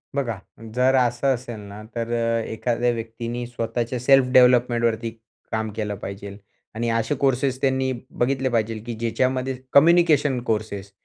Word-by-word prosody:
बघा, 120 -7 -1 0.4
जर 130 +1 +3
असं 125 +1 +2
असेल 120 -2 -8
ना, 100 0 -10
तर 115 0 -3 0.4
एखाद्या 120 +2 0
व्यक्तीने 115 +1 -5
स्वतःच्या 120 +1 -3
सेल्फ 135 +1 +5
डेव्हलपमेंटवरती 120 -2 +4 0.4
काम 110 0 -1
केलं 105 -2 -3
पाहिजे. 100 +1 -8 0.4
आणि 115 +1 -1
असे 115 +4 0
कोर्सेस 130 0 +1
त्यांनी 130 -1 +1 0.2
बघितले 130 +1 0
पाहिजे, 115 -1 0
की 120 - -4
ज्याच्यामध्ये 130 +3 -1 0.2
कम्युनिकेशन 150 -3 +5
कोर्सेस 105 -4 -3
120 Hz, 130 wpm, -23 LUFS, 115-130 Hz, 0.4 s, सेल्फ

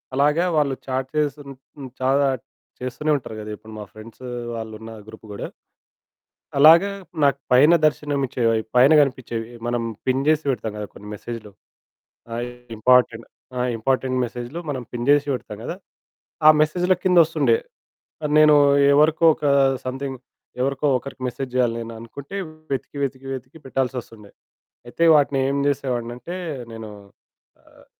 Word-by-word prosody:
అలాగా 150 +5 +3
వాళ్ళు 140 -3 +2
చాట్ 130 0 -2
చేసున్ 145 -1 -2 0.3
హ్మ్, 135 -2 -8
చాట్ 135 -1 +1 0.4
చేస్తూనే 130 +5 -2
ఉంటారు 120 -4 -9
గదా! 105 0 -7
ఇప్పుడు 110 0 -13
మా 105 - -7
ఫ్రెండ్సు 115 +4 -11 0.3
వాళ్ళు 110 -1 -6
ఉన్న 115 0 -9 0.2
గ్రూప్ 110 0 -13
గూడా. 100 - -5 1.1
అలాగా 165 +7 +7 0.3
నాకు 140 -1 +3
పైన 140 +6 +6
దర్శనమిచ్చేవి 140 -5 0
అవి. 110 0 0
పైన 130 +4 +6
కనిపించేవి. 120 -5 -2 0.2
మనం 120 -1 -1 0.2
పిన్ 130 +1 +1
చేసి 155 0 +3
పెడతాం 120 -4 -2
కదా 105 - -4
కొన్ని 105 - -12
మెసేజు‌లు! 110 0 -8 0.8
అవి 120 +1 -3 0.3
ఇంపార్టెంట్ 120 0 +3 0.3
ఆ! - - 0 0.2
ఇంపార్టెంట్ 130 +2 0
మెసేజు‌లు 120 +6 -7
మనం 130 -3 -3
పిన్ 120 0 -3
చేసి 145 0 +4
పెడతాం 120 -4 -6
కదా! 170 - -4 0.7
ఆ - - +11
మెసేజుల 175 +4 +2
కింద 180 -2 +4
ఓస్తుండే. 165 - +2 0.7
ఆ! - - +2
నేను 155 -1 +7 0.4
ఎవరికో 155 +3 +3
ఒక 155 - -8 0.4
సమ్‌థింగ్ 135 +1 -4 0.4
ఎవరికో 135 +2 -1
ఒకరికి 135 +1 -10
మెసేజ్ 130 +1 -5
జేయాలి 125 -2 +2
నేను 115 0 -8
అనుకుంటే 140 +9 -9 0.4
వెతికి, 135 +2 -4
వెతికి, 135 0 -6
వెతికి 130 +4 -9
పెట్టాల్సొస్తుండే. 125 -5 -4 0.6
అయితే 165 - 0
వాటిని 145 -2 +3
ఏం 140 +1 0
చేసేవాడినంటే, 125 +2 -3 0.4
నేను 110 -1 -8 0.7
ఆహ్, - - -22
130 Hz, 140 wpm, -22 LUFS, 120-145 Hz, 1.1 s, ఆ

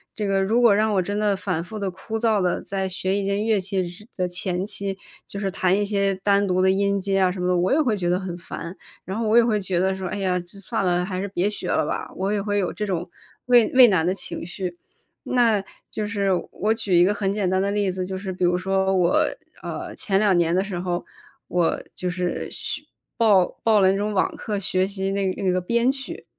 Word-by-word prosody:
这 210 - -2
个 195 -1 +1
如 225 +5 +2
果 230 -4 +6
让 215 +1 +2
我 190 - +3
真 205 +3 -2
的 205 -2 +2
反 180 -4 -2
复 215 +5 -8
地、 195 -2 -2
枯 220 +5 -5
燥 220 -3 +2
地 180 -1 0
在 190 -1 -3
学 185 +1 -2
一 200 - -2
件 200 +2 0
乐 220 -3 +2
器 190 -1 -1
时 190 +6 -11
的 185 - 0
前 180 +1 0
期， 200 -2 -2 0.3
就 200 - -8
是 195 -1 -2
弹 185 0 +2
一 205 - +1
些 200 -1 +1
单 200 0 +3
独 185 0 +1
的 190 0 +4
音 200 +1 +1
阶 195 0 0
啊 185 -1 +4
什 180 0 -4
么 180 - 0
的， 180 - +2
我 180 +8 +2
也 310 - +4
会 225 -7 +1
觉 175 -2 -1
得 180 - +2
很 185 -2 -5
烦， 170 +1 -8 0.3
然 190 +3 -5
后 225 - -1
我 220 - +3
也 235 - +7
会 215 -3 +1
觉 185 -2 -1
得 190 0 +2
说， 185 -1 -4
哎 200 - -4
呀， 180 -2 0
就 175 +3 -13
算 220 -2 -2
了， 175 0 +2
还 185 0 -3
是 200 - -2
别 190 +1 0
学 210 - -5
了 - - +1
吧， - - -3
我 195 +2 -1
也 205 -1 0
会 205 0 -1
有 185 -3 0
这 210 - -3
种 175 -2 -2 0.4
畏 240 -3 +5
畏 255 -2 +9
难 175 -4 +2
的 185 - +2
情 195 - -4
绪。 180 -1 -5 0.5
那 230 -5 +3 0.3
就 210 -1 -3
是 200 -3 -1 0.2
我 215 +4 0
举 210 -5 -1
一 175 - +7
个 200 +3 +3
很 195 -1 -1
简 200 -3 0
单 190 0 +1
的 200 - 0
例 205 -2 0
子， 185 0 -3
就 190 0 -4
是 190 -1 -5
比 180 -1 -1
如 180 0 +2
说 190 +1 +1
我， 180 -1 +3 0.4
呃， - - -6
前 195 -2 0
2 200 -4 +3
年 170 0 +2
的 190 - +2
时 190 -3 -4
候， 175 -1 -2 0.4
我 175 -2 +1
就 180 - -2
是 180 0 -2
学 - - -5 0.4
报 205 -6 +5 0.2
报 215 -3 +4
了 190 0 +5
那 195 - 0
种 210 +1 -1
网 190 - +1
课， 210 -2 -3
学 185 -1 0
习 195 -1 -3
那 195 -1 0
个 185 - -4
那 185 - +2
个 185 - +1
编 235 +7 +2
曲， 270 0 -6
195 Hz, 275 characters per minute, -23 LUFS, 185-205 Hz, 0.5 s, 畏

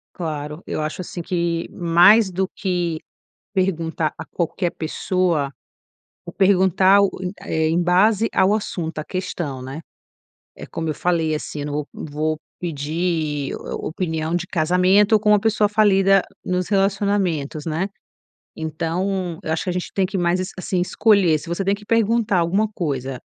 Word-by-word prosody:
Claro, 150 -1 -5
eu - - -3
acho, 155 +4 -3
assim, 175 -1 -6
que 170 -2 -1
mais 180 +5 +5
do 190 +1 -1
que 175 -4 -1 0.5
perguntar 165 -5 0
a - - -7
qualquer 175 +1 -2
pessoa 165 -2 -1 0.8
ou 170 - -7
perguntar, 190 0 +4 0.4
eh, 160 0 0
em 170 +2 +2
base 200 +5 +3
ao 190 +1 +3
assunto, 170 -7 -3
a 155 - -3
questão, 170 -8 -4
né. 135 +4 -6 0.8
É - - -9
como 160 -1 -4
eu 155 - -2
falei, 165 -2 0
assim, 150 0 -5
eu - - -3
não 145 - -4
vou 150 0 -2
vou 155 +1 -3 0.2
pedir 155 -2 -2
o - - -6
opinião 160 -1 -2
de 175 +1 -2
casamento 185 +6 +3
com 210 0 +1
uma 210 0 +6
pessoa 215 0 +2
falida 195 -2 +4 0.2
nos 180 0 -1
relacionamentos, 195 -7 0
né. 165 +5 -1 0.7
Então, 170 +3 -2
eu - - -3
acho 160 - 0
que - - -3
a - - -3
gente 180 - -4
tem 195 - +2
que 195 0 -3
mais 175 +1 +1
es 185 +2 -3
assim, 185 0 -2
escolher, 180 -3 +3
se 160 - -10
você 175 +3 -1
tem 195 - +3
que 205 - -6
perguntar 230 -3 +2
alguma 185 +6 +2
coisa 135 - -3
175 Hz, 160 wpm, -21 LUFS, 160-195 Hz, 0.8 s, uma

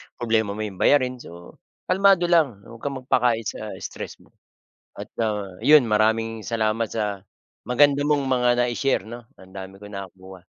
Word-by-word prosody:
problema 110 -3 0
mo 110 - -4
'yong 100 -3 -7
bayarin, 130 -3 +3
so, 85 -6 -13 0.3
kalmado 195 -1 +4
lang, 135 -12 +2
huwag 115 0 -13
kang 140 +1 -4
mag-pakain 120 -3 +2
sa 110 0 -6
stress - - -7
mo. - - -25 0.7
At - - -6 0.2
ah, 105 -2 -1 0.2
yun, 145 +1 +6
maraming 110 +1 +1
salamat 110 0 -1
sa 105 -3 -3 0.4
maganda 140 +3 +3
mong 145 -1 +1
mga 125 -2 +2
nai-share 120 +2 0
'no, 120 +2 -9 0.2
ang 95 0 -17
dami 95 0 -9
kong 105 0 -12
nakuha. 95 -1 -10
115 Hz, 160 wpm, -23 LUFS, 105-130 Hz, 0.7 s, yun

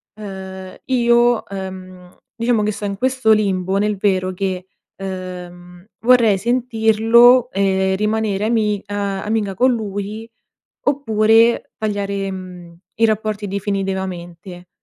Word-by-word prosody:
ehm, 190 -2 -8
io, 240 -2 +3
ehm, 185 -2 -9 0.2
diciamo 230 -2 +1
che 210 - 0
sto 205 - -6
in 200 -1 -3
questo 255 -1 +2
limbo 190 -3 0
nel 210 0 0
vero 185 -2 0
che, 185 -1 -3 0.3
ehm, 180 -1 -8 0.2
vorrei 235 -5 +5
sentirlo 235 +2 +4
e 190 -1 +1
rimanere 210 -1 0
ami 215 -3 +1
a 200 -1 -3
amica 210 -2 -1
con 255 +6 +3
lui, 210 0 -5 0.6
oppure 225 -4 +3
tagliare, 200 -2 -2
mhmm, 180 -2 -9 0.2
i - - +5
rapporti 215 -1 -2
definitivamente. 190 -3 -4
200 Hz, 115 wpm, -19 LUFS, 190-220 Hz, 0.6 s, vorrei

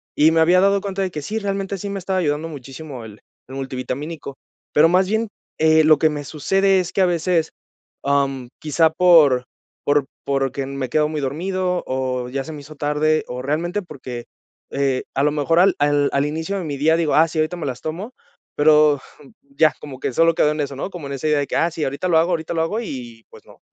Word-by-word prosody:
Y 155 +2 +5
me 165 - +2
había 180 +3 +5
dado 200 0 +3
cuenta 195 0 -4
de 185 -2 -1
que 150 - -5
sí, 215 +9 -3
realmente 195 -1 -3
sí 200 +2 -5
me 200 -1 -3
estaba 190 +1 -1
ayudando 150 -1 -1
muchísimo 135 -3 -9
el 105 -1 -11 0.3
el 135 - -8
multivitamínico. 135 +2 -5 0.4
Pero 160 +2 +6
más 185 +1 +3
bien, 220 +1 0 0.3
eh, 160 0 +5
lo 155 0 +6
que 155 +2 +3
me 145 -1 -4
sucede 195 +6 +1
es 180 - -3
que 195 - +1
a - - +5
veces, 170 -1 0 0.5
am, 135 -3 0
quizá 160 +1 +2
por 160 -8 +5 0.4
por 145 -1 +2 0.2
porque 135 -1 -1
me 135 -2 -4
quedo 150 -1 +2
muy 155 -2 -3
dormido, 180 +6 -2
o 130 -1 -2
ya 135 +1 -3
se 160 - -8
me 150 - -8
hizo 155 +2 -12
tarde, 150 +2 +1
o 125 +1 -5
realmente 170 +9 -1
porque, 130 -8 -8 0.5
eh, 135 -2 0
a 135 - +2
lo 150 - +3
mejor 155 +3 +1
al 190 +1 +5
al 145 -1 +2
al 140 +1 +2
inicio 160 +6 -3
de 175 - -5
mi 145 -2 -4
día 160 +3 +3
digo: 165 -3 +1
"Ah, 160 +2 +5
sí, 155 0 -4
ahorita 155 +3 0
me 155 - -5
las 125 -3 -4
tomo", 180 +10 -5 0.4
pero, 150 -1 +5 0.2
mm 135 - -17 0.3
ya, 155 -3 +5
como 135 -3 -9
que 130 - -3
solo 165 +4 +3
quedó 150 - +3
en 150 - -4
eso, 140 -1 -4
¿no?, 140 - -4
como 165 -6 -7
en 140 - -5
esa 140 +3 -3
idea 150 -1 +3
de 140 - -1
que - - -4
ah, 170 0 +2
sí, 160 -2 -4
ahorita 140 +7 -2
lo 165 - +4
hago, 170 +3 +1
ahorita 160 -1 -2
lo 165 - 0
hago, 205 +8 -1
y 120 - -8
pues - - -15
no. - - -18
155 Hz, 235 wpm, -21 LUFS, 140-175 Hz, 0.5 s, Pero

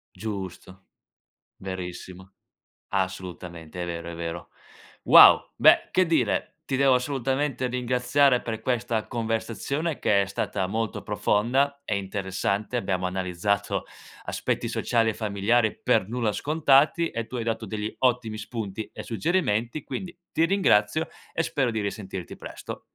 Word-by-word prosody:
Giusto, 95 -3 -7 0.7
verissimo. 95 0 -7 0.6
Assolutamente, 90 -3 -4
è - - -2
vero, 85 0 -5
è 85 - -8
vero. 85 0 -5 0.5
Wow, - - +8
beh, - - +5
che 185 0 +3
dire, 165 -1 0
ti 135 - -1
devo 135 -1 +5
assolutamente 135 0 0
ringraziare 125 +2 +2
per 110 -1 -4
questa 120 -3 -1
conversazione 120 +7 -2
che 100 -1 +3
è - - 0
stata 95 0 -2
molto 110 +1 -2
profonda 135 +7 +1
e 105 - -1
interessante. 100 +3 -2
Abbiamo 95 -4 -1
analizzato 95 +2 -1 0.4
aspetti - - -2
sociali 115 -1 +1
e - - -1
familiari 110 +2 +1
per 95 - +2
nulla 115 -1 -1
scontati 150 +4 +3
e 115 -1 -4
tu - - -8
hai 120 - -2
dato 115 0 -2
degli 105 +1 -4
ottimi 120 -4 +1
spunti 110 -2 -5
e - - -7
suggerimenti, 120 - 0
quindi 175 -2 -6
ti 165 - +3
ringrazio 160 - +2 0.2
e 165 - 0
spero 135 -6 0
di 110 -2 -2
risentirti 95 -3 -5
presto. - - -8
110 Hz, 135 wpm, -26 LUFS, 95-130 Hz, 0.7 s, Wow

